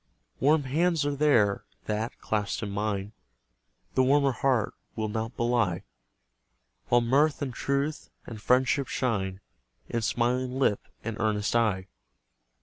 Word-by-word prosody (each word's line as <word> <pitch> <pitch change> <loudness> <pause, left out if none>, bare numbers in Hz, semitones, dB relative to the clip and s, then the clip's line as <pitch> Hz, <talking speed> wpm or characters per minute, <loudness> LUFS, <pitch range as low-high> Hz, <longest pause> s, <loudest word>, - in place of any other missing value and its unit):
Warm 150 +3 +4
hands 160 +3 +1
are 145 - 0
there, 120 -9 +3 0.2
that, 110 +2 -2
clasped 105 0 -2
in 100 - -3
mine, 100 0 -2 0.8
The - - +3
warmer 140 +1 +4
heart 125 -4 +1 0.2
will 110 -1 -2
not 110 +2 -4
belie; 120 -7 +1 1.0
While 120 0 +4
mirth, 140 +6 +3
and 130 -3 -4
truth, 140 +4 -2 0.2
and 110 -3 -8
friendship 130 +3 +2
shine 95 -6 -1 0.5
In 115 - -1
smiling 125 +3 0
lip 120 -7 +2 0.2
and 115 -1 -4
earnest 105 -1 0
eye. 105 -5 +1
120 Hz, 130 wpm, -28 LUFS, 105-135 Hz, 1.0 s, Warm